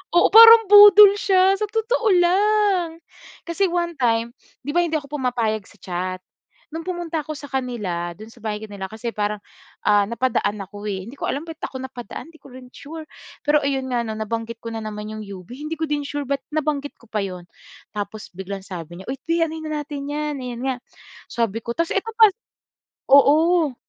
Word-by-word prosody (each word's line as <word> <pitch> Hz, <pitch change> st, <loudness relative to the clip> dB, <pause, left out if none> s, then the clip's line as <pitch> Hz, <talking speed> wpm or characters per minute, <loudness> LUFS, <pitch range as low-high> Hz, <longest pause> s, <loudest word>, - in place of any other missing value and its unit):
oo, 350 Hz, -, +6 dB
parang 455 Hz, +1 st, +10 dB
budol 415 Hz, -1 st, +10 dB
siya 385 Hz, -1 st, +4 dB
sa 425 Hz, -, 0 dB
totoo 450 Hz, +2 st, -1 dB
lang. 390 Hz, 0 st, +2 dB, 0.6 s
Kasi 375 Hz, +3 st, +1 dB
one 345 Hz, -1 st, -1 dB
time, 230 Hz, -1 st, +1 dB, 0.3 s
'di 290 Hz, -, -2 dB
ba -, -, +5 dB
hindi 330 Hz, -2 st, -2 dB
ako 290 Hz, -1 st, -10 dB
pumapayag 230 Hz, -4 st, -1 dB
sa -, -, -19 dB
chat. 185 Hz, 0 st, -4 dB, 0.5 s
No'ng 325 Hz, -, -4 dB
pumunta 345 Hz, -3 st, -3 dB
ako 310 Hz, 0 st, -6 dB
sa 285 Hz, -, -9 dB
kanila, 210 Hz, -11 st, -3 dB
do'n 215 Hz, -, -11 dB
sa 235 Hz, -, -19 dB
bahay 210 Hz, -1 st, -2 dB
nila 200 Hz, -2 st, -7 dB
kasi 230 Hz, +1 st, -5 dB
parang, 210 Hz, 0 st, -2 dB, 0.5 s
ah, 205 Hz, -1 st, +4 dB
napadaan 235 Hz, -3 st, 0 dB
ako 205 Hz, +2 st, -7 dB
eh. 190 Hz, -1 st, -4 dB
Hindi 250 Hz, -, -10 dB
ko -, -, -4 dB
alam 285 Hz, +4 st, -3 dB
ba't 325 Hz, -1 st, -9 dB
ako 260 Hz, -, -5 dB
napadaan, 255 Hz, -1 st, -8 dB
'di 320 Hz, -, -18 dB
ko 275 Hz, -, -15 dB
rin 255 Hz, 0 st, -12 dB
sure. 315 Hz, +2 st, -9 dB, 0.4 s
Pero 295 Hz, 0 st, +3 dB
ayun 270 Hz, -1 st, -1 dB
nga 245 Hz, -1 st, 0 dB
'no, 220 Hz, -1 st, -5 dB
nabanggit 225 Hz, +1 st, -4 dB
ko 230 Hz, 0 st, -6 dB
na 225 Hz, -, -4 dB
naman 210 Hz, -1 st, -6 dB
'yong 215 Hz, 0 st, -7 dB
UB. 195 Hz, -3 st, -10 dB
Hindi 305 Hz, +3 st, -6 dB
ko 320 Hz, -, -1 dB
din 290 Hz, 0 st, -1 dB
sure 285 Hz, 0 st, -4 dB
ba't 275 Hz, 0 st, -1 dB
nabanggit 295 Hz, -2 st, -2 dB
ko 235 Hz, -, -20 dB
pa 215 Hz, -2 st, -1 dB
'yon. 180 Hz, -2 st, -7 dB, 0.5 s
Tapos 210 Hz, +1 st, -6 dB
biglang 190 Hz, +1 st, -7 dB
sabi 175 Hz, -3 st, -8 dB
niya, -, -, -12 dB
"Uy, 265 Hz, -, -2 dB
'te 330 Hz, +4 st, 0 dB
anuhin 320 Hz, 0 st, -7 dB
na 300 Hz, -1 st, -2 dB
natin 285 Hz, -1 st, -6 dB
'yan." 300 Hz, 0 st, -3 dB
Ayan 245 Hz, -1 st, -6 dB
nga, 260 Hz, -, 0 dB, 0.6 s
sabi 230 Hz, -2 st, -1 dB
ko. 235 Hz, -, -4 dB
Tapos 335 Hz, 0 st, 0 dB
eto 450 Hz, +3 st, -1 dB
pa 445 Hz, -, +9 dB, 0.8 s
oo. 305 Hz, +1 st, +5 dB
270 Hz, 200 wpm, -22 LUFS, 215-325 Hz, 0.8 s, parang